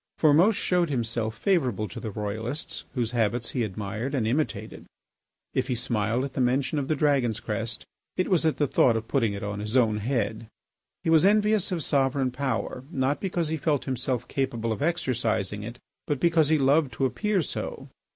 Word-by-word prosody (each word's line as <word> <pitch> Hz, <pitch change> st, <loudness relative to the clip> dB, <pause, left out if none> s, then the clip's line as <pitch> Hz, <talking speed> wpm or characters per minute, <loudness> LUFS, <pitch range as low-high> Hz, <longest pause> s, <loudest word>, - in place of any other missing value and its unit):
Formose 165 Hz, +8 st, +5 dB
showed 180 Hz, -4 st, +1 dB
himself 115 Hz, -4 st, -2 dB
favourable 130 Hz, -, +1 dB
to -, -, -8 dB
the 110 Hz, -, -5 dB
Royalists, 110 Hz, +10 st, -4 dB
whose 120 Hz, -3 st, -1 dB
habits 115 Hz, 0 st, 0 dB
he 125 Hz, -, 0 dB
admired 110 Hz, +6 st, -3 dB
and 120 Hz, -5 st, 0 dB
imitated. 140 Hz, +7 st, -2 dB, 0.7 s
If -, -, 0 dB
he 125 Hz, -, 0 dB
smiled 115 Hz, 0 st, 0 dB
at 135 Hz, -1 st, -4 dB
the -, -, -1 dB
mention 130 Hz, +4 st, +1 dB
of 135 Hz, -, -3 dB
the 155 Hz, -, +1 dB
Dragon's 135 Hz, -7 st, +2 dB
crest 110 Hz, 0 st, -3 dB, 0.3 s
it 185 Hz, -, +1 dB
was 180 Hz, -4 st, +2 dB
at 160 Hz, -1 st, +1 dB
the 145 Hz, -, +2 dB
thought 120 Hz, -3 st, +3 dB
of 110 Hz, 0 st, -5 dB
putting 115 Hz, -7 st, +1 dB
it 100 Hz, -, -5 dB
on 105 Hz, 0 st, -3 dB
his 105 Hz, +4 st, -1 dB
own 110 Hz, -4 st, +3 dB
head. 110 Hz, -1 st, -2 dB, 0.6 s
He 165 Hz, -, +1 dB
was 160 Hz, 0 st, +6 dB
envious 210 Hz, 0 st, +3 dB
of 170 Hz, -4 st, -1 dB
sovereign 135 Hz, -1 st, +1 dB
power, 130 Hz, -1 st, -2 dB
not 135 Hz, -2 st, 0 dB
because 175 Hz, -4 st, -1 dB
he 160 Hz, -, -1 dB
felt 150 Hz, -2 st, 0 dB
himself 125 Hz, -2 st, -2 dB
capable 120 Hz, -4 st, -1 dB
of 110 Hz, -, -3 dB
exercising 120 Hz, -, 0 dB
it, 115 Hz, +3 st, -7 dB, 0.3 s
but 145 Hz, -3 st, 0 dB
because 160 Hz, -2 st, +3 dB
he 160 Hz, -, +4 dB
loved 140 Hz, -1 st, +3 dB
to 135 Hz, +4 st, 0 dB
appear 190 Hz, -, 0 dB
so. -, -, -5 dB
130 Hz, 190 wpm, -26 LUFS, 115-150 Hz, 0.7 s, was